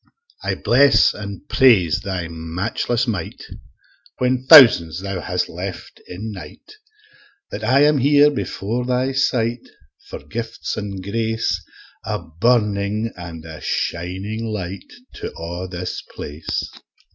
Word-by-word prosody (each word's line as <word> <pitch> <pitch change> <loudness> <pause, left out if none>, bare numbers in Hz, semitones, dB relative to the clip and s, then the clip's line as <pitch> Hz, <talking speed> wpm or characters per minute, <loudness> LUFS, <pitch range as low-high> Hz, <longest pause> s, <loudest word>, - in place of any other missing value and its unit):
I - - -1
bless 140 +4 +4
and 100 +6 -8
praise 100 - +4
Thy 95 -3 -4
matchless 90 +9 -2
might, 105 -9 -4 0.7
When 125 0 0
thousands 90 - +8
Thou 100 -1 -4
hast - - -1
left - - -7
in 105 +5 -6
night, 95 - -11 0.8
That 105 - -6
I 130 +6 +4
am 150 -1 +4
here 145 +2 +5
afore 115 +6 -3
Thy 125 +1 0
sight, 120 -3 0 0.4
For - - -6
gifts 115 0 -5
an' 100 -3 -5
grace 110 +3 -1 0.4
A - - -2
burning 105 +4 0
and 85 -2 -9
a 80 -1 -9
shining 95 +6 -3
light 100 -4 -5 0.3
To - - -5
a' 85 +2 -5
this 90 0 -5
place. 75 +2 -5
105 Hz, 125 wpm, -20 LUFS, 90-120 Hz, 0.8 s, thousands